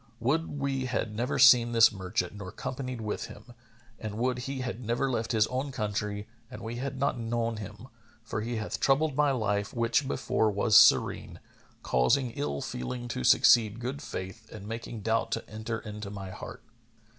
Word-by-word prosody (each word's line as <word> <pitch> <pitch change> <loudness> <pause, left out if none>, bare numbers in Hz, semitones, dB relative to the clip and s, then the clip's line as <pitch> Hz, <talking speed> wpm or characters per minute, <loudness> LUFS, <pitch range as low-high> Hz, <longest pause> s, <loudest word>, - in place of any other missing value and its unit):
Would 145 +5 0
we 135 -2 -1
had 115 -3 -2
never 120 +4 -1
seen 120 -3 +7
this 115 -1 +7
merchant 95 -2 -3
nor 100 -2 -8
companied 130 +1 -5
with 105 -1 -3
him; 120 - -12 0.5
and 105 -1 -5
would 125 +1 0
he 135 -1 -3
had 125 -1 -4
never 120 +4 0
left 115 -2 -1
his 110 -2 +3
own 130 +4 -3
country 105 -2 -3 0.2
and 125 - -9
we 115 +1 -5
had 135 +1 -4
not 135 -2 0
known 115 0 -1
him, 105 +3 -9 0.4
for 110 -1 -4
he 120 +2 -3
hath 110 -1 -3
troubled 140 +1 +2
my 150 0 +3
life 105 -5 -1
which 115 +4 +1
before 110 -4 +1
was 105 +1 +1
serene, - - +5 0.4
causing 90 - +2
ill 70 -8 -3
feeling 120 - -5
to 65 - -3
succeed 110 - +5
good 130 +4 -4
faith 95 -9 -7
and 105 -2 -9
making 115 0 -6
doubt 115 +2 0
to - - -3
enter 110 +1 -4
into 105 -2 -7
my 100 -2 -7
heart." - - -9
115 Hz, 180 wpm, -29 LUFS, 105-130 Hz, 0.5 s, seen